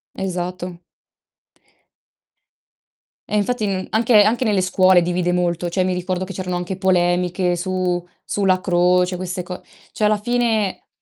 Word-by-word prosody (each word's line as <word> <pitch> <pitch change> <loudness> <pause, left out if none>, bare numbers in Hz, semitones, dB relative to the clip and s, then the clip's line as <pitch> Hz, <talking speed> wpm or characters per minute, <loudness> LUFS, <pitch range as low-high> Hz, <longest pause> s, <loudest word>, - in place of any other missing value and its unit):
Esatto. 180 -1 -5 2.5
E 210 - 0
infatti 215 +2 0
n 190 -2 -2
anche 220 -1 +5
anche 230 +4 +1
nelle 205 -5 +2
scuole 185 0 +4
divide 175 +1 0
molto. 175 -1 0
Cioè, 185 +1 0
mi 185 - 0
ricordo 180 +1 -2
che 195 - -8
c'erano 180 -1 -3
anche 180 +2 -4
polemiche 180 -1 +1
su 180 -1 -2 0.2
sulla 190 -2 +1
croce 180 0 +2
queste 180 0 -4
co 180 0 -8 0.3
cioè 215 - -3
alla 210 0 +3
fine, 225 -3 -1
185 Hz, 135 wpm, -20 LUFS, 180-200 Hz, 2.5 s, anche